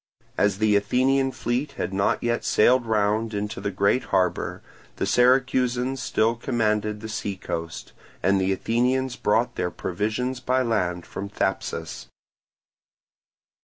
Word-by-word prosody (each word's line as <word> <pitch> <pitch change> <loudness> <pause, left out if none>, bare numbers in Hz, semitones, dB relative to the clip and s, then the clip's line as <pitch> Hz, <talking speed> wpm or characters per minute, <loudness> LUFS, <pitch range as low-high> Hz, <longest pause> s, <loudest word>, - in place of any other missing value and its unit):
As 100 -2 +2
the 110 0 +3
Athenian 130 +6 +2
fleet 130 +4 -2
had - - -4
not 100 +1 +1
yet 120 0 0
sailed 120 +2 +3
round 110 +1 +1
into 105 +2 -3
the - - -1
great 100 +6 +1
harbour, 95 -2 0 0.3
the - - -1
Syracusans 125 0 +2
still 110 -2 +1
commanded 110 -3 -1
the 110 - -6
seacoast, 95 -6 -5 0.3
and 100 0 +3
the 95 +1 +1
Athenians 125 +5 0
brought 115 +3 +1
their 90 - 0
provisions 110 +9 -2
by 130 +1 +1
land 90 -7 -1
from 100 +1 -6
Thapsus. 85 - -3
110 Hz, 130 wpm, -24 LUFS, 100-125 Hz, 0.3 s, the